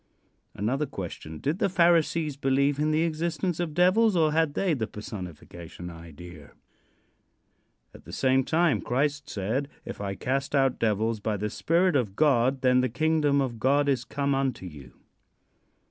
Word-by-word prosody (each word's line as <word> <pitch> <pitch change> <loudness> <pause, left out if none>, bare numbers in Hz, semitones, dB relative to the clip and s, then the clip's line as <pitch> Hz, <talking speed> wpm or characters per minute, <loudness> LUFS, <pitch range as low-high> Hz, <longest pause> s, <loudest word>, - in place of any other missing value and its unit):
Another 135 +9 -1
question: 85 - -7
Did 150 - -2
the 210 - +2
Pharisees 170 -4 +2
believe 140 +1 +1
in 150 +1 +1
the 155 +1 +2
existence 170 +2 -2
of 165 -4 -3
devils, 190 +4 +4
or 160 -3 +3
had 160 -2 +1
they 190 -4 +1
the 115 -7 -2
personification 90 -4 -9
idea? 85 -1 -12 1.4
At - - -15
the - - -10
same 130 0 +2
time 165 +2 +2
Christ 145 +3 -1
said: 110 +8 -2 0.2
"If - - -7
I 100 -1 -3
cast 135 +6 -2
out 135 -2 +2
devils 110 0 0
by 105 0 -2
the 105 +1 -3
Spirit 175 +1 +1
of 110 -8 0
God, 130 -2 +2
then 125 0 +4
the 130 - 0
kingdom 150 +1 +1
of 120 -4 -3
God 140 +4 +2
is 135 -3 +1
come 140 0 -1
unto 135 -7 -1
you." 75 -7 -11
135 Hz, 160 wpm, -27 LUFS, 110-155 Hz, 1.4 s, devils